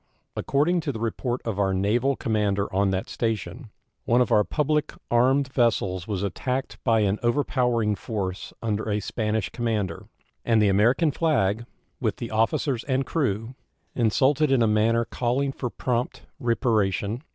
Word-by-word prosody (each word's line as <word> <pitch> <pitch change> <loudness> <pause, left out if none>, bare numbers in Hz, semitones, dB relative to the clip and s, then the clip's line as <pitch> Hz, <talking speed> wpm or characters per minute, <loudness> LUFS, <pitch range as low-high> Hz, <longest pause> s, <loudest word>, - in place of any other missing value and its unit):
According 155 +6 +1
to 155 -3 -2
the 115 - -6
report 120 +2 -2
of 110 -3 -2
our 95 -1 +1
naval 120 +8 +1
commander 105 -4 -1
on 100 +1 +2
that 95 0 -2
station, 115 +2 -3 0.4
one 120 - +3
of 125 0 +2
our 105 -2 +5
public 150 +4 0 0.2
armed 130 +3 +3
vessels 100 -7 +1
was 100 -3 -2
attacked 120 +1 -3
by 115 -1 +3
an 100 0 +1
over 120 +5 +2
powering 120 -6 +1
force 100 -3 -4
under 110 -1 -1
a 105 0 +1
Spanish 105 0 -2
commander, 110 -7 -2 0.4
and 115 -2 +3
the 105 -1 +4
American 120 - +3
flag, 120 - 0 0.3
with - - 0
the 120 - -6
officers 115 +3 0
and 135 -1 0
crew, 120 -6 -1 0.4
insulted 135 +5 +2
in 130 -3 +4
a - - +3
manner 115 +2 +2
calling 130 +4 -1
for 125 -2 -4
prompt 125 +1 -2 0.2
reparation. 110 -2 0
115 Hz, 155 wpm, -25 LUFS, 105-130 Hz, 0.4 s, our